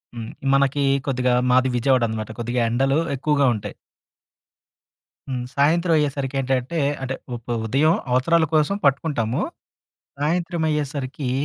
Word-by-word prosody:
హ్మ్! 115 -1 -6 0.2
మనకి 140 +1 +2 0.2
కొద్దిగా, 125 -1 +1 0.2
మాది 130 +1 +4
విజయవాడనమాట. 115 -4 +1
కొద్దిగా, 120 +1 -1
ఎండలు 135 +4 +1 0.2
ఎక్కువగా 140 +1 +1
ఉంటాయి. 105 - -6 1.5
హ్మ్! 125 -2 -3
సాయంత్రం 165 +5 +3
అయ్యేసరికి 140 -2 -1
ఏంటంటే, 130 +5 -1 0.2
అంటే, 130 0 -3 0.2
వప్ 120 0 -6
ఉదయం 140 +8 +3 0.2
అవసరాల 160 +6 +3
కోసం 155 +6 +2
పట్టుకుంటాము. 135 -4 +1 0.8
సాయంత్రం 170 +2 -1
అయ్యేసరికి 140 -3 -3
135 Hz, 110 wpm, -22 LUFS, 125-150 Hz, 1.5 s, మాది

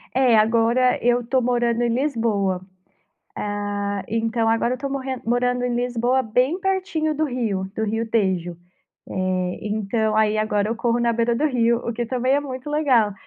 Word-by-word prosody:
É, 250 -4 +4
agora 230 +3 +3
eu 245 0 +3
estou 255 +2 0
morando 240 -1 +1
em 240 - +1
Lisboa. 225 -8 0 0.7
Ah, 205 -1 -3
então 225 +1 0
agora 230 +2 +2
eu - - 0
estou 275 +2 -5
morren 265 -2 -4
morando 245 +1 +1
em 245 - -1
Lisboa 245 +1 +1
bem 250 +8 +1
pertinho 370 -5 -1
do 310 +1 0
rio, 225 -8 -2
do 220 - -1
rio 225 +1 -2
Tejo. 185 -6 0 0.5
Eh, 185 -1 -2
então 215 +1 -1
aí 215 0 +3
agora 215 -1 0
eu 230 - -1
corro 235 0 0
na 235 -1 +2
beira 235 +1 +1
do 290 - 0
rio, 235 -3 +2
o 235 - -1
que 240 +1 -3
também 255 +2 0
é 290 - +2
muito 260 0 -7
legal. 260 -9 +2
235 Hz, 175 wpm, -22 LUFS, 215-255 Hz, 0.7 s, É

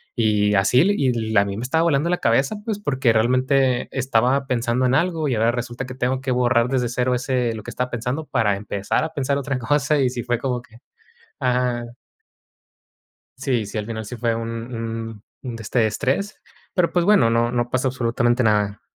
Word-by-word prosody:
Y 105 -3 +2
así, 105 +6 +4
l 200 +3 +3
y 140 - +1 0.2
l 110 - +5
a 100 - +3
mí 100 0 -4
me 115 - -4
estaba 160 +6 +1
volando 160 -1 +2
la 180 - +2
cabeza, 135 - +1
pues, 220 -2 -2
porque 130 - +1
realmente 130 +2 +2
estaba 130 +1 +1
pensando 125 0 0
en 125 - +2
algo 165 0 +1
y 135 - 0
ahora 115 +2 +2
resulta, 120 +1 -4
que 130 - -8
tengo 130 +1 -1
que 130 -1 -2
borrar 125 -1 +2
desde 125 -2 0
cero, 125 +1 0
ese 125 -1 -1
lo 110 - -8
que - - -7
estaba 125 0 -2
pensando 125 +7 -3
para 115 -8 +1
empezar 100 +3 -2
a 160 0 -4
pensar 140 -1 0
otra 140 -1 -2
cosa. 145 +5 +1
Y 130 - +3
sí 125 -1 -5
fue 120 -1 0
como 125 -1 -2
que 115 -1 -19 0.6
ajá. 125 -1 0 1.5
Sí, 130 -4 -1
sí, 105 - -6
al 105 - -2
final 110 -1 -5
sí 125 - -7
fue 115 -1 0
un 115 0 -4 0.2
un 115 -1 -5 0.2
un 120 -3 -5
de 115 - -8
este 110 +1 +1
estrés, 135 - -2 0.4
pero, 180 -3 +2
pues, 175 - +2
bueno, 195 - +4
no 115 +1 +2
no 120 0 -1
pasa 130 +1 +1
absolutamente 120 0 +1
nada. 105 -1 +1
125 Hz, 205 wpm, -22 LUFS, 115-135 Hz, 1.5 s, l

